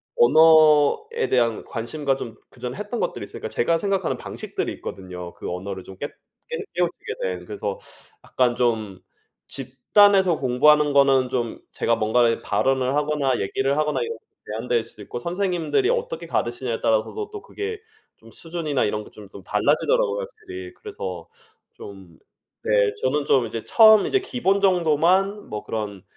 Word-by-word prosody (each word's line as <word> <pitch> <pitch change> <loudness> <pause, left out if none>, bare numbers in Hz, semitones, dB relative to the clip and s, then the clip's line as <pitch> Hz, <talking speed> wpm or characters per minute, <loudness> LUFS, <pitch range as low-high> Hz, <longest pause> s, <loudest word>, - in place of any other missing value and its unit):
언어에 155 - +5
대한 115 -3 +1
관심과 135 +4 -2
좀 115 -4 -7
그 125 - -20
전에 125 +4 -5
했던 210 +3 -4
것들이 - - -2
있으니까 - - -7
제가 170 - +1
생각하는 195 0 -1
방식들이 - - -4
있거든요. 90 -2 -8
그 - - -7
언어를 95 +1 -5
좀 95 - -11
깻 145 - -5 0.4
깨 480 - -3 0.2
깨우치게 175 -1 -2
된. 90 -1 -3
그래서 100 -1 -4 0.5
약간 125 -2 +1
좀 110 -6 -1 0.5
집단에서 175 +8 +3
공부하는 145 +3 +4
거는 135 -2 +4
좀 120 -3 -2
제가 115 - +1
뭔가에 115 +2 +2
발언을 135 0 +1
하거나 145 -3 0
얘기를 135 +8 0
하거나 150 0 0
이런 460 0 -3 0.3
제한될 115 +2 -1
수도 110 - -13
있고 120 - -6
선생님들이 180 - 0
어떻게 485 0 -2
가르치느냐에 120 0 -2
따라서도 115 - 0
또 420 - -7
그게 420 +2 -6 0.4
좀 - - -17
수준이나 165 -4 -3
이런 105 0 -1
게 - - -14
좀, 105 -2 -13
좀 100 - -11
달라지더라고요 440 - +1
확실히. 375 -6 -8
그래서 435 +3 -7 0.5
좀 95 -4 -12 0.4
네. - - -2 0.3
저는 140 +3 +1
좀 130 -4 +3
이제 115 - -5
처음 220 -2 +7
이제 395 - +2
기본 240 - 0
정도만 185 +3 +2
뭐 105 - -5
그런 105 -4 -5
140 Hz, 350 characters per minute, -23 LUFS, -, 0.5 s, 처음